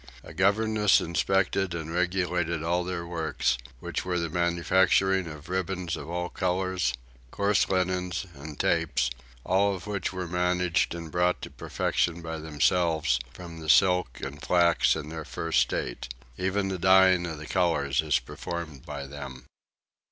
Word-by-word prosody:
A - - -11
governess 105 +1 +3
inspected 95 +1 0
and 80 -1 -5
regulated 90 -2 0
all 90 +2 +1
their 90 -1 -4
works, 80 -7 -1 0.2
which - - -4
were 90 -1 -1
the 85 -2 -2
manufacturing 90 +2 +2
of 75 0 -9
ribbons 90 -1 -2
of 70 - -8
all 90 +1 -2
colours, 90 -7 0 0.3
coarse 100 +7 +1
linens, 90 0 0
and 75 +1 -10
tapes; 65 -1 +1 0.3
all 100 +1 +2
which 100 -2 -3
were 90 -2 -4
managed 90 -1 +1
and 85 -2 -7
brought 90 +1 +1
to - - -7
perfection 85 0 -1
by 80 -1 -5
themselves 80 -2 +1
from 85 +1 -10
the 80 -1 -6
silk 90 -5 +4
and 70 +3 -6
flax 85 +2 +3
in 75 - -5
their 80 0 -5
first 80 +1 -1
state; - - -2 0.2
even 95 +5 -1
the 95 -1 -3
dying 95 -1 +5
of 80 -2 -5
the 75 - -8
colours 75 -6 +1
is 75 -2 +2
performed 80 +1 -6
by 70 -2 -6
them. 70 -2 -9
85 Hz, 150 wpm, -27 LUFS, 80-95 Hz, 0.3 s, dying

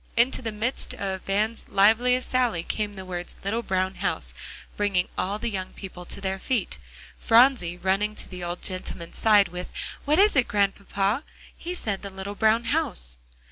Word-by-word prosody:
Into 245 +3 +3
the 225 -3 -3
midst 225 +5 -3
of 190 -1 -3
Van's 215 +3 0
liveliest 235 +6 +4
sally, 245 -10 +2
came 210 +1 -2
the 190 -1 -7
words 175 -1 -5
"little 220 +4 0
brown 190 -3 0
house," - - -2 0.4
bringing 200 -3 +1
all 200 +3 -1
the 235 +1 -3
young 185 -2 -4
people 180 -2 -9
to - - -6
their 190 -1 -2
feet, 250 +4 -1 0.4
Phronsie 230 -7 +5
running 195 +4 +1
to - - -5
the 180 -1 -7
old 175 0 -4
gentleman's 185 -3 -4
side, 210 -4 +5
with, 180 +1 -6 0.3
"What 300 +2 +2
is 410 -1 +5
it, 260 -3 +4
Grandpapa? 200 +3 +1 0.3
He 355 +2 -5
said 205 - -2
the 200 - -6
little 190 +1 -6
brown 220 +2 +3
house." 230 - -1
205 Hz, 175 wpm, -26 LUFS, 190-230 Hz, 0.4 s, Phronsie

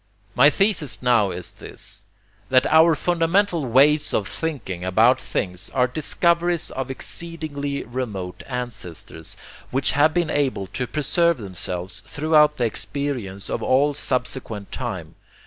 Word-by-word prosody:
My - - +7
thesis 195 -11 0
now 120 -5 +4
is 90 -1 -5
this, - - -8 0.5
that 130 0 +4
OUR 160 +1 +5
FUNDAMENTAL 170 -1 +1
WAYS 145 +5 +4
OF 100 - 0
THINKING 110 - -4
ABOUT 115 +8 +4
THINGS 90 0 -3
ARE 125 -1 +4
DISCOVERIES 170 +5 +1
OF 135 0 -4
EXCEEDINGLY 145 -1 -4
REMOTE 110 -7 -5
ANCESTORS, 105 - -6 0.3
WHICH 135 +2 +2
HAVE 150 +3 +3
BEEN 170 -3 +1
ABLE 135 -9 0
TO 125 +7 -4
PRESERVE 170 +3 +1
THEMSELVES 95 -3 -3
THROUGHOUT 150 0 +3
THE 120 - +1
EXPERIENCE 115 -5 -3
OF - - -3
ALL 140 +3 +3
SUBSEQUENT 125 -6 -2
TIME. - - -5
135 Hz, 130 wpm, -23 LUFS, 110-155 Hz, 0.5 s, My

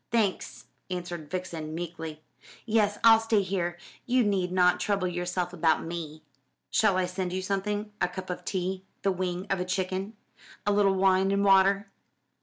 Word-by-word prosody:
"Thanks," 220 -5 -1 0.2
answered 175 -4 -5
Vixen 165 -3 -4
meekly. 160 -2 -6 0.4
"Yes, 210 -2 +2
I'll 225 -1 +8
stay 225 -2 +2
here 175 -2 -2 0.3
you 250 0 +3
need 190 -4 0
not 180 -1 +4
trouble 200 -3 0
yourself 180 0 -2
about 165 -2 +2
me." 160 -2 -6 0.5
"Shall 200 -4 +3
I 185 - +2
send 180 0 -3
you 185 0 -2
something? 205 +2 -2
A - - +3
cup 185 +1 -6
of 180 - -6
tea, 185 0 -2 0.2
the 195 - +3
wing 180 0 -2
of 195 - +1
a - - 0
chicken, 185 +2 -2 0.5
a 205 - +2
little 200 -1 +3
wine 190 0 +3
and 200 +1 +1
water?" 195 +1 +4
185 Hz, 165 wpm, -28 LUFS, 175-200 Hz, 0.5 s, I'll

